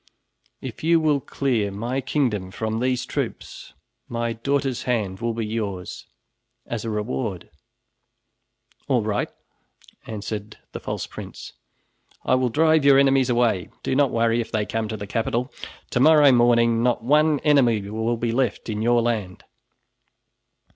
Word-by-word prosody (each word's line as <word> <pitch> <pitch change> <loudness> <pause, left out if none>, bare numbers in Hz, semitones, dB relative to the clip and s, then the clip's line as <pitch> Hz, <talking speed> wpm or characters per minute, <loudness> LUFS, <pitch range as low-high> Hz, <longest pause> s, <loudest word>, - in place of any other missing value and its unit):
If 130 +1 -8
you 165 +1 +4
will 150 -3 +2
clear 125 -7 -1
my 120 +7 -3
kingdom 120 -9 -1
from 110 +3 -3
these 125 0 0
troops, - - -5 0.3
my 115 0 -2
daughter's 135 +2 -1
hand 100 -6 -1
will 115 -1 -2
be 115 -1 -2
yours 105 -5 -5 0.6
as 115 -3 -4
a 115 - -3
reward." 105 -2 -3 1.4
"All - - +2
right," - - -1 0.8
answered 105 0 -6
the - - -6
false - - -4
prince, - - -9 0.7
"I - - +2
will 130 -1 +2
drive 155 +3 +3
your 140 -1 +6
enemies 135 -2 +4
away. 120 -6 +1
Do - - -1
not 140 -1 +3
worry 115 0 +1
if 115 - -7
they 110 -1 0
come 110 0 -2
to 110 0 -5
the 100 - -6
capital. 115 +5 -2 0.4
To 125 - +1
morrow 150 0 +7
morning 120 -1 +4
not 120 -1 +1
one 150 +3 +3
enemy 120 -9 +3
will 110 +3 -1
be 115 0 -1
left 120 -2 -1
in 105 -1 -2
your 120 +1 +3
land." 105 -6 -2
120 Hz, 145 wpm, -23 LUFS, 110-135 Hz, 1.4 s, morrow